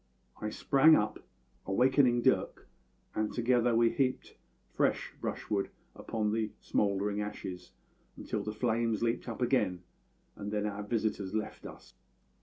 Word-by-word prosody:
I 105 - -2
sprang 140 +8 +5
up, 105 0 0 0.5
awaking 125 +3 +3
Dirk, - - +1 0.5
and 110 0 -1
together 120 -1 +2
we 115 0 +4
heaped 130 -2 -1 0.4
fresh - - 0
brushwood 100 -2 -2 0.3
upon 105 -2 -2
the 110 0 0
smouldering 100 0 0
ashes 95 -3 -6 0.5
until 105 - -3
the 105 +1 -4
flames 115 0 0
leaped 115 +1 -1
up 115 +2 -3
again, 105 -8 +1 0.5
and 105 0 -6
then 105 -1 -1
our 105 0 -3
visitors 105 -2 -2
left 110 0 -4
us. - - -13
110 Hz, 130 wpm, -31 LUFS, 105-120 Hz, 0.5 s, sprang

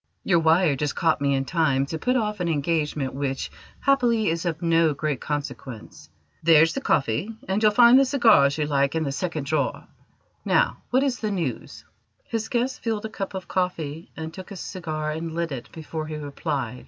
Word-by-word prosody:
Your 175 -3 +3
wire 160 -1 +3
just 145 +1 -2
caught 160 -3 +1
me 140 -1 +2
in 135 0 -1
time 135 -3 +1
to 160 +3 -5
put 250 +10 +1
off 210 -4 -1
an 175 - -1
engagement 150 -3 -1
which, 135 -1 -3 0.3
happily, 240 -6 +3
is 165 +2 -2
of 160 -2 -2
no 165 -2 +2
great 150 -2 -2
consequence. 140 -5 -6 0.3
There's 165 0 +5
the 275 - -3
coffee, 155 - 0
and 190 +3 0
you'll 215 -1 +5
find 240 +3 +7
the 275 - +4
cigars 220 - +4
you 150 - 0
like 140 0 +1
in 160 - +1
the 140 - -2
second 155 -1 -3
drawer. 150 0 -1 0.6
Now, - - +2
what 260 +2 +3
is 270 -3 -1
the 215 - -2
news?" 170 - -4 0.4
His 225 -1 -4
guest 250 +2 -1
filled 220 -2 -2
a - - -4
cup 195 -3 -5
of 185 - -6
coffee 165 -4 -2
and 160 0 -6
took 185 0 -9
a 200 - -8
cigar 155 -5 -4
and 160 +1 -5
lit 170 -1 -2
it 130 -3 -7
before 160 -1 -6
he 155 - -5
replied. 140 -4 -4
160 Hz, 195 wpm, -24 LUFS, 145-200 Hz, 0.6 s, find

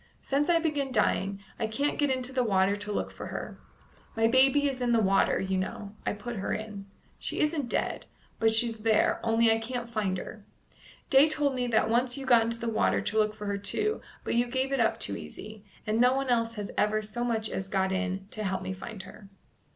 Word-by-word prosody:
Since 285 +4 0
I 345 - +5
began 295 -5 -1
dying, 200 -3 0 0.2
I 225 - 0
can't 280 +7 -1
get 290 -1 +2
into 260 0 -1
the 255 -1 +2
water 195 -2 +2
to 205 0 -6
look - - -2
for - - -8
her. - - -6 0.6
My 225 0 +2
baby 270 +4 +4
is 265 -2 -3
in 240 -1 +2
the 230 - +4
water, 195 -2 +3
you 190 0 -1
know; 200 +2 -5
I - - +1
put 210 +3 -6
her 195 - -3
in. 210 -2 -6 0.3
She - - -3
isn't 300 -4 0
dead, - - -2 0.3
but 225 0 +4
she's 225 0 +2
there, 220 0 +2
only 225 0 +4
I 225 - +2
can't 235 +1 -5
find 205 -5 -1
her. 210 +3 -8 0.7
Day 275 +3 +7
told 295 -2 +1
me 250 -1 -1
that 220 -2 +2
once 245 +3 +1
you 270 - -6
got 240 -3 +6
into 230 +1 -1
the 235 - -4
water 225 - +2
to 220 - -2
look 215 0 +1
for 210 - -7
her 200 0 -2
too, 425 - -1 0.2
but - - -2
you 240 +1 +2
gave 260 +2 -1
it 275 - 0
up 225 - +2
too 100 - -2
easy, 205 - -9 0.2
and 215 +2 +1
no 250 +1 +5
one 270 -1 -1
else 230 -1 +1
has 205 -2 -5
ever 215 +1 +2
so 225 +3 -4
much 225 -2 0
as 195 -2 -4
got 190 -1 +1
in 190 0 -2
to 215 - -4
help 190 -1 -2
me 190 0 -3
find 190 +1 -8
her." 195 +1 -13
225 Hz, 230 wpm, -28 LUFS, 205-255 Hz, 0.7 s, Day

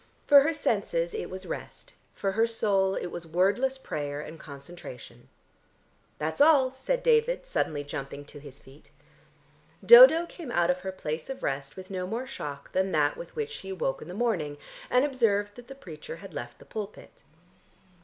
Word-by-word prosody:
For 285 -1 +8
her 305 +4 +2
senses - - -1
it 440 - -4
was 185 +1 -7
rest, - - -7 0.2
for 195 - -1
her 225 +4 +2
soul 195 -4 +1
it 175 - -4
was 170 -1 -6
wordless 200 +11 +1
prayer 145 - -4
and 155 +2 -8
concentration. 140 -5 -11 0.9
"That's 160 - -2
all," 285 -4 +6
said - - -2
David 480 +1 +2
suddenly 155 - -1
jumping 140 0 -6
to 145 - -12
his 140 -2 -12
feet. 135 +3 -18 1.0
Dodo 475 -9 +10
came 340 -4 -9
out 175 -6 +2
of 180 - -3
her 190 +1 -5
place 160 - -5
of 270 0 -6
rest 135 +2 -3
with 185 +1 -9
no 185 -1 -3
more 230 +6 -3
shock 145 - -7
than 190 0 0
that 150 -1 +2
with 170 - -10
which 450 0 -3
she 195 - -8
awoke 180 -8 -2
in - - -9
the 180 - -7
morning, 185 -11 -1 0.3
and 250 +3 +4
observed 210 -7 +1
that 245 -1 -12
the 270 - -9
preacher 160 - -9
had 195 +3 -12
left 120 0 -7
the - - -16
pulpit. 210 -1 -8
190 Hz, 180 wpm, -28 LUFS, -, 1.0 s, Dodo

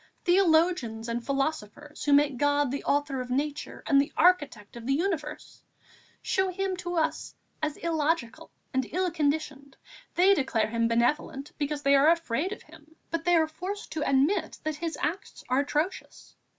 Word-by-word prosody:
Theologians 330 - +2
and 235 0 -3
philosophers, 275 0 -3
who 290 - +3
make 285 -2 +4
God 290 -1 +2
the 280 - -4
author 280 -2 0
of 250 - -7
Nature 285 +3 -3
and 275 -1 +5
the 280 - -4
architect 290 - +2
of 235 0 -8
the 275 - +2
universe, 315 -3 -3 0.6
show 380 0 +1
Him 380 +1 -2
to 355 0 -4
us 320 -1 -1 0.3
as 305 -1 -2
illogical 320 -6 -1 0.2
and 260 -1 -1
ill 365 0 0
conditioned. 290 -3 -2 0.4
They 375 +3 +6
declare 240 - 0
Him 230 0 +1
benevolent, 255 +4 0
because 290 0 -2
they 275 - +4
are 280 +3 +6
afraid 335 0 0
of 425 - -7
Him, 315 0 -18 0.2
but 330 0 -2
they 350 0 +4
are 320 -1 +3
forced 370 +6 -6
to 310 -1 -2
admit 275 +9 +1
that 310 -1 -2
His 330 0 -4
acts 330 +7 -3
are 255 +1 +3
atrocious. 300 +6 -3
295 Hz, 165 wpm, -28 LUFS, 275-335 Hz, 0.6 s, They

